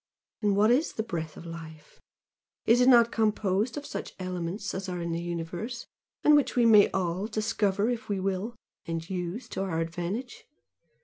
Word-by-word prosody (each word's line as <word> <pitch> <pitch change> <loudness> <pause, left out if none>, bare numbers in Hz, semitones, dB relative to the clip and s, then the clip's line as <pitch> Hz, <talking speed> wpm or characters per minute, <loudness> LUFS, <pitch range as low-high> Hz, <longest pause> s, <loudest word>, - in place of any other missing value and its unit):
And 205 -2 +2
what 215 +3 +5
is 275 +7 +2
the 220 - -2
breath 165 -7 -5
of - - -10
life? 160 -2 -10 0.6
Is 235 +2 +5
it 250 - +6
not 235 -2 +6
composed 215 +1 +1
of 290 - -5
such - - -6
elements 185 +2 -4
as 190 0 -4
are 180 -1 -3
in 170 0 -3
the 165 +1 -2
universe 175 +8 -4 0.4
and 300 - +7
which 290 - +2
we 240 -1 +4
may 215 -3 +7
all 185 +1 -1
discover 215 -2 0
if 240 -3 -3
we 200 -2 0
will, 195 +4 -2 0.3
and 165 0 -3
use 180 +5 -4
to - - -3
our 185 -4 -1
advantage? 175 +9 -4
195 Hz, 180 wpm, -28 LUFS, 170-225 Hz, 0.6 s, and